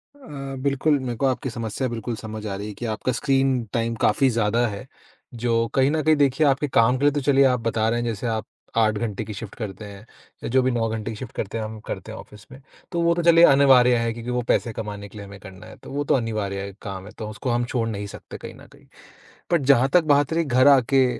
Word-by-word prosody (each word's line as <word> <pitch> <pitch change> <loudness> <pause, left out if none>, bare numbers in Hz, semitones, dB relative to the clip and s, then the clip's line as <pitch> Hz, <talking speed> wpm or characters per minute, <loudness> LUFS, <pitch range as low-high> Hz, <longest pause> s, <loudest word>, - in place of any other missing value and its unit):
अ, 140 - -8
बिल्कुल 140 +1 +2
मेरे 125 -2 -4
को 135 - 0
आपकी 130 0 -1
समस्या 115 +3 -3
बिल्कुल 115 0 -4
समझ 110 0 -7
आ 100 - -3
रही 100 +2 -6
है 105 - -6
कि 120 +4 -7
आपका 130 - -2
स्क्रीन 135 -1 +1
टाइम 115 0 -1
काफ़ी 130 +5 +3
ज़्यादा 115 0 +1
है। 105 +4 -7 0.5
जो 115 -1 0
कहीं 135 0 +4
न 160 0 0
कहीं 155 +1 +4
देखिए 145 +1 +2
आपके 140 +2 +1
काम 125 -1 +3
के 140 - -4
लिए 145 - +5
तो 145 0 -2
चलिए 140 0 +4
आप 125 -2 +2
बता 115 -1 0
रहे 120 +1 0
हैं 120 - -2
जैसे 115 +1 -3
आप 110 -1 -2 0.3
8 110 -2 +3
घंटे 110 -1 -3
की 105 - -7
शिफ्ट 100 0 -8
करते 105 -2 -7
हैं, 100 +1 -11 0.4
या - - -3
जो 130 +2 +3
भी 130 0 +1
9 115 -1 0
घंटे 110 0 -4
की - - -6
शिफ्ट 125 0 -8
करते 105 +2 -4
हैं, 110 - -3
हम 110 0 -8
करते - - -6
हैं - - -8
ऑफिस 105 -1 -14
में, 130 +2 -12 0.3
तो 170 -2 -1
वो 170 0 +3
तो 175 - -1
चलिए 170 0 +6
अनिवार्य 130 -3 +6
है 115 0 0
क्योंकि 120 +1 -6
वो 125 0 0
पैसे 115 - 0
कमाने 105 -2 -6
के 105 - -13
लिए 100 -1 -8
हमें 100 0 -11
करना 95 +1 -12
है। 110 - -12
तो - - -10
वो 145 +1 -2
तो - - +2
अनिवार्य 100 -5 -3
काम 95 -1 -7
है 105 - -11
तो 110 -1 -5
उसको 110 +4 -5
हम 120 0 0
छोड़ 120 -2 -2
नहीं 105 -2 -4
सकते - - -10
कहीं - - -9
न - - -15
कहीं। - - -20 0.7
बट 170 - +3
जहाँ 130 +1 +3
तक 180 - +5
बात 145 +2 +2
रही 170 - +1
घर 130 -2 +3
आके 135 -1 +5
120 Hz, 260 wpm, -23 LUFS, 110-135 Hz, 0.7 s, चलिए